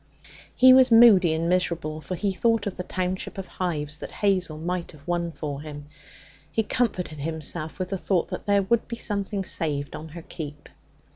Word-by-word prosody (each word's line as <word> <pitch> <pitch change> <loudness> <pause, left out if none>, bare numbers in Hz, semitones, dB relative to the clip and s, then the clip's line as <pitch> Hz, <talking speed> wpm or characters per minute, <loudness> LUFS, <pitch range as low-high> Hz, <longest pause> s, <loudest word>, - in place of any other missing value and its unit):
He 255 0 +8
was 260 0 +7
moody 225 -7 +7
and 160 +1 0
miserable, 170 -3 0
for 155 +5 -4
he 195 +2 -1
thought 225 +2 +1
of 200 - -3
the - - -4
township 185 +1 -3
of 195 - -4
hives 150 -6 -3
that - - -7
Hazel 185 -6 0
might 175 +2 -4
have 145 -2 -17
won 170 -1 -1
for 145 -3 -5
him. 145 -1 -8 0.7
He 225 - +1
comforted 185 -10 -1
himself 160 +1 -3
with 185 -1 -3
the 195 - -3
thought 180 -3 0
that - - -6
there 200 -1 +3
would 225 +4 +1
be 235 - -4
something 200 -2 -2
saved 145 -5 -2
on 160 - -7
her 170 - -8
keep. 145 -4 -8
180 Hz, 190 wpm, -25 LUFS, 155-200 Hz, 0.7 s, He